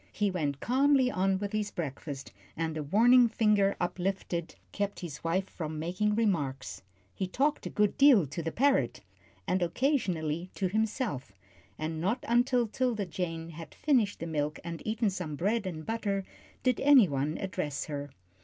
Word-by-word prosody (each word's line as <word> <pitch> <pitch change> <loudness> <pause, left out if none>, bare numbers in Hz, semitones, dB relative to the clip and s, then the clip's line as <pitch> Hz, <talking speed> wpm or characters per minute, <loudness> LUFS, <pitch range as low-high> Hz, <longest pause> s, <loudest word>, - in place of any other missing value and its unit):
He 205 -2 0
went 145 -6 -2
calmly 265 0 +3
on 190 +1 +1
with 200 +1 -4
his 215 -1 -1
breakfast, 140 -5 -6 0.3
and 160 -1 -2
a 155 - -2
warning 235 - +5
finger 210 -3 +3
uplifted 175 -1 -2 0.2
kept 205 0 -3
his 155 -5 -7
wife 185 +4 0
from 155 -2 -5
making 180 +7 0
remarks. 140 - -1 0.3
He 190 - -3
talked 285 +10 0
a - - -4
good 210 +5 +1
deal 270 - +7
to 145 +5 -5
the 165 0 -3
parrot, 255 - +2 0.4
and 185 - 0
occasionally 175 - 0
to 190 -2 0
himself, 215 - -2 0.4
and 155 +1 -3
not 210 +8 -1
until 245 +1 +3
'Tilda 225 -2 -1
Jane 165 -2 -4
had 165 -1 -10
finished 240 -9 +1
the - - -4
milk 150 -2 -2
and 170 -1 -6
eaten 220 -1 +1
some 175 -5 -4
bread 205 +6 0
and 155 -4 -6
butter 205 -3 -1 0.4
did 255 -2 +2
any 270 -7 +7
one 145 +1 -1
address 150 -7 -3
her. 145 -1 -5
190 Hz, 165 wpm, -30 LUFS, 160-225 Hz, 0.4 s, deal